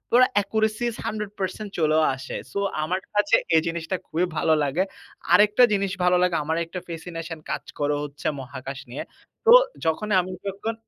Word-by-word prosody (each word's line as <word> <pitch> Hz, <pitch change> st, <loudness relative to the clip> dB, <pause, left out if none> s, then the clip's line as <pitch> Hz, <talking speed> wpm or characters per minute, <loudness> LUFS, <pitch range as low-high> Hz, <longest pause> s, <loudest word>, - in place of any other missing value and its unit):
ওরা 255 Hz, +1 st, +7 dB
accuracies 220 Hz, +3 st, -1 dB
100% 210 Hz, -2 st, -4 dB
চলেও 155 Hz, -1 st, +3 dB
আসে। 130 Hz, -, -7 dB, 0.2 s
So 200 Hz, -, -2 dB, 0.2 s
আমার 180 Hz, +4 st, -1 dB
কাছে 205 Hz, 0 st, +4 dB, 0.2 s
এই 160 Hz, -, +6 dB
জিনিসটা 170 Hz, +2 st, -2 dB
খুবই 175 Hz, +3 st, 0 dB
ভালো 160 Hz, +1 st, +3 dB
লাগে। 145 Hz, +7 st, +1 dB, 0.5 s
আরেকটা 210 Hz, +4 st, +6 dB
জিনিস 195 Hz, -1 st, 0 dB
ভালো 180 Hz, 0 st, +4 dB
লাগে 180 Hz, -2 st, +2 dB
আমার 160 Hz, +2 st, -1 dB
একটা 180 Hz, +2 st, -6 dB
fascination 165 Hz, -1 st, -6 dB
কাজ 150 Hz, 0 st, -2 dB, 0.2 s
করে 145 Hz, 0 st, +1 dB
হচ্ছে 145 Hz, -1 st, -5 dB
মহাকাশ 130 Hz, +1 st, -7 dB
নিয়ে। 130 Hz, -, -5 dB, 0.4 s
তো 465 Hz, -, +7 dB, 0.3 s
যখনই 195 Hz, +6 st, +1 dB
আমি 185 Hz, +1 st, -7 dB, 0.2 s
যখন 200 Hz, +4 st, -3 dB
180 Hz, 160 wpm, -24 LUFS, 155-205 Hz, 0.5 s, ওরা